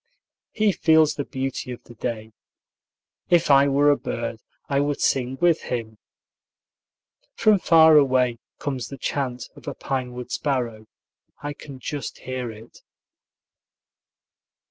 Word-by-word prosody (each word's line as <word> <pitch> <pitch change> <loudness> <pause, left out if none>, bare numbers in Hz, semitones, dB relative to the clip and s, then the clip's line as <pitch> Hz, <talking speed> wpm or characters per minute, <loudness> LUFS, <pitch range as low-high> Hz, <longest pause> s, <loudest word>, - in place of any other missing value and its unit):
He 215 -1 +2
feels 160 -4 +4
the 145 - -3
beauty 135 0 -4
of 120 - -8
the 120 - -14
day. 110 -1 -5 1.0
If 170 -4 +4
I 140 0 +6
were 145 +1 +4
a - - +4
bird, 115 -4 -4 0.3
I 140 -1 +1
would 145 0 0
sing 130 0 0
with 175 -2 +3
him. 110 -3 -5 1.4
From 215 -2 +4
far 160 -3 +7
away 130 -4 +3 0.2
comes 135 -4 -4
the 140 - -8
chant 125 -2 -3
of - - -15
a - - -4
pine 130 -2 -3
wood 125 0 -8
sparrow. 120 -6 -2 0.6
I 145 0 -3
can 140 -1 -11
just 140 +2 -5
hear 130 -2 -5
it. 110 +2 -14
135 Hz, 135 wpm, -24 LUFS, 125-145 Hz, 1.4 s, far